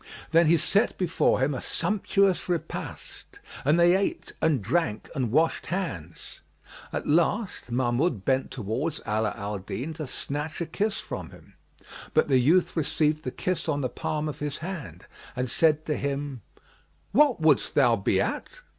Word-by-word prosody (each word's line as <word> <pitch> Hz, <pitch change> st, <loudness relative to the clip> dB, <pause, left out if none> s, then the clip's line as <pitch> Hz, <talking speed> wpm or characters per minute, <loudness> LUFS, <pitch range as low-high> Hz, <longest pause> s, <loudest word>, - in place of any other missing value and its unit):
Then 165 Hz, 0 st, +5 dB
he 170 Hz, +2 st, +5 dB
set 200 Hz, +8 st, +1 dB
before 175 Hz, -7 st, +2 dB
him 140 Hz, +2 st, +2 dB
a 130 Hz, -, -4 dB
sumptuous 195 Hz, -3 st, +1 dB
repast 165 Hz, -2 st, -5 dB, 0.2 s
and 150 Hz, +5 st, +3 dB
they 175 Hz, +1 st, +6 dB
ate 195 Hz, +1 st, -2 dB
and 155 Hz, -4 st, +3 dB
drank 115 Hz, -, -1 dB
and 125 Hz, -5 st, -1 dB
washed 160 Hz, +5 st, +2 dB
hands. 170 Hz, -, -5 dB, 0.5 s
At -, -, -3 dB
last 175 Hz, -, +1 dB
Mahmud 120 Hz, -, 0 dB
bent 130 Hz, 0 st, +1 dB
towards 130 Hz, +7 st, -3 dB
Ala 105 Hz, 0 st, +1 dB
al 100 Hz, 0 st, -4 dB
Din 130 Hz, +11 st, -5 dB
to 155 Hz, -2 st, -6 dB
snatch 150 Hz, +4 st, -4 dB
a 170 Hz, -, -1 dB
kiss 205 Hz, +6 st, -1 dB
from -, -, -6 dB
him, -, -, -16 dB, 0.6 s
but -, -, +3 dB
the 130 Hz, -2 st, +5 dB
youth 165 Hz, +9 st, +3 dB
received 155 Hz, -1 st, +1 dB
the 130 Hz, -, -3 dB
kiss 170 Hz, +4 st, -2 dB
on 145 Hz, -2 st, 0 dB
the 130 Hz, -, -1 dB
palm 155 Hz, +4 st, -3 dB
of 150 Hz, -, -5 dB
his 150 Hz, -1 st, -3 dB
hand 170 Hz, -2 st, -7 dB, 0.3 s
and 125 Hz, 0 st, -1 dB
said 155 Hz, -1 st, +3 dB
to 150 Hz, -, 0 dB
him, 140 Hz, -3 st, -3 dB, 0.7 s
"What 275 Hz, +1 st, +4 dB
wouldest 155 Hz, -4 st, +3 dB
thou 125 Hz, -5 st, +5 dB
be 100 Hz, -, +1 dB
at?" -, -, -1 dB
150 Hz, 165 wpm, -27 LUFS, 130-170 Hz, 0.7 s, they